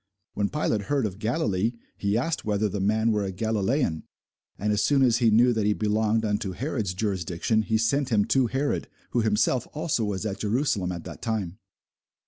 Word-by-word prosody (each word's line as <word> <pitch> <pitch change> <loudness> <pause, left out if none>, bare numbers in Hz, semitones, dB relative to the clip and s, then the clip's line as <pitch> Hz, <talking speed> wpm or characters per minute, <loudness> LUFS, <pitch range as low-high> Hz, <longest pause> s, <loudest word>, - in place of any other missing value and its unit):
When 100 0 0
Pilate 110 -9 -1
heard 140 -4 +1
of 100 -1 -5
Galilee, 110 - 0 0.2
he 100 +1 0
asked 160 +7 -1
whether 105 0 +1
the 100 0 -3
man 110 +3 +2
were 105 -1 +1
a 95 - -3
Galilæan. 110 - 0 0.6
And 105 +1 0
as 105 - +1
soon 140 -2 +3
as 120 -3 +4
he 120 -2 +3
knew 120 +3 +5
that 110 -2 0
he 105 - +3
belonged 110 +1 +1
unto 105 -2 -1
Herod's 115 - -2
jurisdiction, 95 +1 0
he 110 0 0
sent 130 +5 +1
him 105 -4 +3
to 125 +2 +2
Herod, 135 +5 -1 0.2
who 120 - +2
himself 110 +3 +1
also 155 -6 -1
was 105 0 -2
at 100 -2 -3
Jerusalem 110 -4 0
at 85 -2 -5
that - - -9
time. 105 -4 -3
110 Hz, 190 wpm, -26 LUFS, 100-120 Hz, 0.6 s, knew